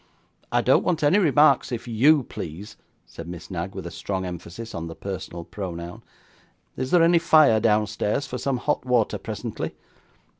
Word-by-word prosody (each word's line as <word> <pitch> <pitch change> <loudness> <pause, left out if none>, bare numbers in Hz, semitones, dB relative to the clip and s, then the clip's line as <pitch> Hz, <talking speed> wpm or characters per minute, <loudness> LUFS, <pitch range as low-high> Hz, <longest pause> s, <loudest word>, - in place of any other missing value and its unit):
'I - - +3
don't - - +3
want 165 -4 0
any 150 +8 +4
remarks 150 -7 +4
if 120 0 -5
YOU 135 +6 +4
please,' 90 0 -8 0.3
said 85 - -10
Miss 85 +2 -9
Knag, 90 +1 -4
with - - -6
a - - -6
strong 95 -2 -4
emphasis 90 +6 -7
on 85 0 -5
the 80 - -8
personal 90 -3 -6
pronoun. 85 -1 -7 0.7
'Is 130 - -3
there 175 +1 +5
any 170 0 +5
fire 155 -9 +5
downstairs 105 +3 +1
for 125 -1 -5
some 135 -2 -1
hot 145 +4 -1
water 125 -4 +1
presently? - - -5
110 Hz, 165 wpm, -24 LUFS, 90-140 Hz, 0.7 s, there